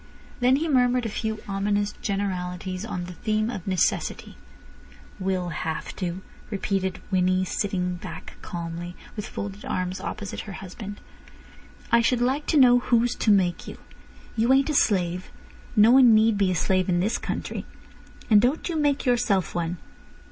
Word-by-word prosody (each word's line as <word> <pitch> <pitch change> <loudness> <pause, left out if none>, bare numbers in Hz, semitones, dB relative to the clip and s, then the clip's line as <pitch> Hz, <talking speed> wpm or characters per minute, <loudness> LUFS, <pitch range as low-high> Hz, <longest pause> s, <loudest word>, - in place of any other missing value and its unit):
Then 250 +1 +4
he 315 +4 0
murmured 250 -3 +3
a - - -1
few 220 0 -3
ominous 205 +1 0
generalities 185 -2 -3
on 180 -5 -4
the 180 - -8
theme 215 +5 -1
of 190 -7 -7
necessity. 185 -4 0 0.8
"Will 185 -2 -1
have 160 0 -4
to," 180 0 -3 0.3
repeated 195 -2 -2
Winnie, 185 0 +2
sitting 180 -2 -2 0.4
calmly 170 +1 -6
back, - - -19
with 210 - -5
folded 200 0 -6
arms, 185 0 -3
opposite 205 -2 -5
her 200 - -7
husband. 195 +2 -8 0.9
"I 235 - +6
should 240 +1 +2
like 265 +5 0
to 310 - +2
know 245 -3 +7
who's 240 0 +2
to - - 0
make 190 -4 +2
you. - - -8 0.6
You 235 +2 +2
ain't 275 +3 +3
a - - -2
slave. 180 -8 +1 0.5
No 215 +1 +7
one 250 -3 +7
need 220 0 +4
be 200 -2 +2
a 185 - 0
slave 185 +2 +1
in 175 -1 +2
this 205 +6 0
country—and 210 -2 -2
don't 260 +7 +1
you 335 - -1
make 290 -2 +1
yourself 230 -8 +1
one." 175 0 -2
200 Hz, 155 wpm, -25 LUFS, 185-235 Hz, 0.9 s, know